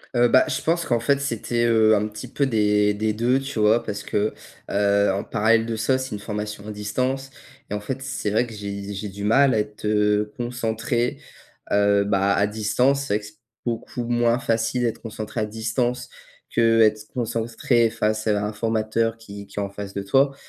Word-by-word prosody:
Heu, 120 Hz, 0 st, +5 dB
bah, 130 Hz, +2 st, +5 dB
je -, -, -1 dB
pense 170 Hz, +1 st, +1 dB
qu'en 120 Hz, -2 st, +1 dB
fait, 140 Hz, +4 st, +2 dB
c'était, 120 Hz, -2 st, -1 dB
heu, 110 Hz, -2 st, +5 dB
un 105 Hz, +1 st, 0 dB
petit 105 Hz, 0 st, -8 dB
peu 140 Hz, -2 st, 0 dB
des 105 Hz, -3 st, +2 dB
des 110 Hz, +1 st, 0 dB
deux, 120 Hz, +4 st, +2 dB
tu 135 Hz, -4 st, -5 dB
vois, 110 Hz, +3 st, +4 dB
parce 105 Hz, 0 st, -4 dB
que, 105 Hz, +1 st, -1 dB, 0.4 s
heu, 100 Hz, 0 st, +3 dB
en 100 Hz, -, -2 dB
parallèle 115 Hz, +1 st, +2 dB
de 115 Hz, -, -2 dB
ça, 130 Hz, +4 st, +1 dB
c'est 130 Hz, -5 st, -4 dB
une -, -, -6 dB
formation 105 Hz, 0 st, -5 dB
à -, -, -4 dB
distance. 130 Hz, +6 st, -2 dB, 0.4 s
Et 105 Hz, -, -2 dB
en -, -, -2 dB
fait, 130 Hz, +6 st, -5 dB
c'est 135 Hz, -6 st, -3 dB
vrai 120 Hz, +3 st, +2 dB
que 115 Hz, -, -10 dB
j'ai 100 Hz, -1 st, -6 dB
j'ai 100 Hz, +1 st, -5 dB
du 100 Hz, +1 st, -8 dB
mal 135 Hz, +5 st, +4 dB
à 110 Hz, -, +2 dB
être, 105 Hz, 0 st, -5 dB
heu, 105 Hz, 0 st, +2 dB
concentré, 120 Hz, 0 st, -2 dB, 0.5 s
heu, 100 Hz, 0 st, +4 dB
bah, 100 Hz, 0 st, +2 dB
à 100 Hz, +1 st, +2 dB
distance, 115 Hz, +6 st, +1 dB
c'est 120 Hz, -, -2 dB
vrai -, -, +1 dB
que 105 Hz, -, -11 dB
c'est 105 Hz, -, -16 dB, 0.3 s
beaucoup 120 Hz, +1 st, -3 dB
moins 120 Hz, 0 st, +2 dB
facile 115 Hz, 0 st, 0 dB
d'être 115 Hz, -2 st, -1 dB
concentré 110 Hz, 0 st, -5 dB
à -, -, +1 dB
distance 120 Hz, +3 st, -2 dB, 0.4 s
qu'être 110 Hz, -2 st, +3 dB
concentré 115 Hz, 0 st, +1 dB
face 110 Hz, 0 st, -1 dB
à 105 Hz, -2 st, +1 dB
un 105 Hz, -, -3 dB
formateur 115 Hz, +1 st, 0 dB
qui 100 Hz, -2 st, -10 dB
qui 105 Hz, -, -7 dB
est -, -, 0 dB
en 100 Hz, -, -3 dB
face 100 Hz, 0 st, -7 dB
de 100 Hz, -, -3 dB
toi. 135 Hz, +7 st, +2 dB
110 Hz, 205 wpm, -23 LUFS, 105-120 Hz, 0.5 s, Heu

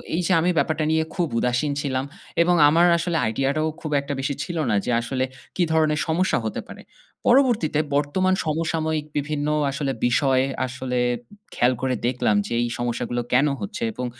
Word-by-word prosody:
এই 180 Hz, -, +1 dB
যে -, -, 0 dB
আমি 180 Hz, -, +2 dB
ব্যাপারটা 155 Hz, -1 st, +1 dB
নিয়ে 160 Hz, 0 st, +2 dB
খুব 175 Hz, -3 st, 0 dB
উদাসীন 125 Hz, +4 st, 0 dB
ছিলাম 130 Hz, -1 st, -2 dB, 0.4 s
এবং 175 Hz, +1 st, +4 dB
আমার 170 Hz, +3 st, +4 dB
আসলে 170 Hz, 0 st, -1 dB
idea 135 Hz, +5 st, 0 dB
টা 155 Hz, -, 0 dB
ও -, -, 0 dB
খুব 155 Hz, -2 st, -5 dB
একটা 145 Hz, +1 st, -4 dB
বেশি 140 Hz, +1 st, -1 dB
ছিল 170 Hz, +3 st, -5 dB
না। 105 Hz, -, +2 dB
যে -, -, -1 dB
আসলে 130 Hz, +2 st, -2 dB, 0.3 s
কী 180 Hz, -, +2 dB
ধরনের 155 Hz, -1 st, +2 dB
সমস্যা 175 Hz, +4 st, +1 dB
হতে 110 Hz, -, -3 dB
পারে? -, -, -10 dB, 0.5 s
পরবর্তীতে 240 Hz, -, +3 dB, 0.2 s
বর্তমান 185 Hz, +7 st, +1 dB
সমসাময়িক 160 Hz, -1 st, -1 dB
বিভিন্ন 145 Hz, 0 st, -2 dB, 0.2 s
আসলে 140 Hz, -1 st, -2 dB, 0.2 s
বিষয় 130 Hz, +1 st, +2 dB, 0.2 s
আসলে 125 Hz, 0 st, -3 dB, 0.5 s
খেয়াল 125 Hz, +1 st, +3 dB
করে 130 Hz, -1 st, 0 dB
দেখলাম 120 Hz, -4 st, +1 dB
যে -, -, -4 dB
এই 120 Hz, -, 0 dB
সমস্যাগুলো 120 Hz, 0 st, -2 dB
কেন 140 Hz, +4 st, +4 dB
হচ্ছে? 210 Hz, +4 st, -5 dB
এবং 125 Hz, -, -4 dB
150 Hz, 180 wpm, -23 LUFS, 130-165 Hz, 0.5 s, এবং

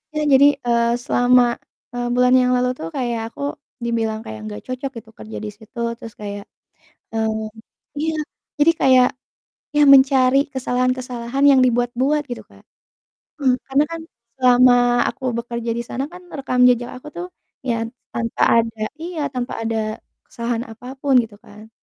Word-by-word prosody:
Ya 305 Hz, -, 0 dB
jadi, 275 Hz, +2 st, +7 dB, 0.2 s
eee, 235 Hz, 0 st, +2 dB
selama, 245 Hz, 0 st, +4 dB, 0.5 s
eee, 245 Hz, 0 st, -2 dB
bulan 250 Hz, 0 st, +4 dB
yang 250 Hz, 0 st, +2 dB
lalu 250 Hz, 0 st, +1 dB
tuh 160 Hz, -, -4 dB
kayak 240 Hz, -3 st, -1 dB
aku 235 Hz, -, -11 dB, 0.4 s
dibilang 225 Hz, -2 st, -1 dB
kayak 110 Hz, 0 st, -7 dB
nggak 105 Hz, 0 st, -7 dB
cocok 255 Hz, +2 st, -4 dB
gitu 225 Hz, -1 st, -11 dB
kerja 220 Hz, -, -8 dB
di -, -, -4 dB
situ, 225 Hz, +2 st, -12 dB, 0.2 s
terus 225 Hz, -, -9 dB
kayak 205 Hz, -1 st, -5 dB, 0.7 s
eee, 220 Hz, -1 st, -1 dB, 0.5 s
iya. 320 Hz, +1 st, -1 dB, 0.4 s
jadi 320 Hz, +3 st, +5 dB
kayak 255 Hz, -1 st, +6 dB, 0.7 s
ya 295 Hz, -, +5 dB
mencari 265 Hz, 0 st, +5 dB, 0.2 s
kesalahan-kesalahan 255 Hz, 0 st, -1 dB
yang 270 Hz, -2 st, +6 dB
dibuat-buat, 245 Hz, +5 st, +1 dB
gitu, 245 Hz, -, -5 dB
Kak. -, -, -19 dB, 0.8 s
Mhm, 260 Hz, -2 st, +3 dB
karena 275 Hz, +2 st, +3 dB
kan 330 Hz, -, -5 dB, 0.4 s
selama 250 Hz, -1 st, +6 dB, 0.4 s
aku 265 Hz, -, -7 dB
bekerja 235 Hz, 0 st, -4 dB
di 235 Hz, -, -2 dB
sana 265 Hz, +2 st, -3 dB
kan, 360 Hz, 0 st, -11 dB, 0.2 s
rekam 255 Hz, -2 st, -1 dB
jejak 245 Hz, -1 st, +1 dB
aku 300 Hz, -, -11 dB
tuh, 355 Hz, +1 st, -4 dB, 0.4 s
ya 235 Hz, -, +2 dB, 0.4 s
tanpa 230 Hz, -1 st, -2 dB, 0.2 s
ada 225 Hz, -1 st, -1 dB, 0.2 s
iya, 340 Hz, -1 st, -5 dB
tanpa 245 Hz, -1 st, -3 dB
ada 225 Hz, 0 st, -1 dB, 0.5 s
kesalahan 235 Hz, 0 st, -3 dB
apapun, 265 Hz, +4 st, -3 dB
gitu 220 Hz, -2 st, -10 dB
kan. 215 Hz, +1 st, -14 dB
245 Hz, 150 wpm, -20 LUFS, 230-265 Hz, 0.8 s, jadi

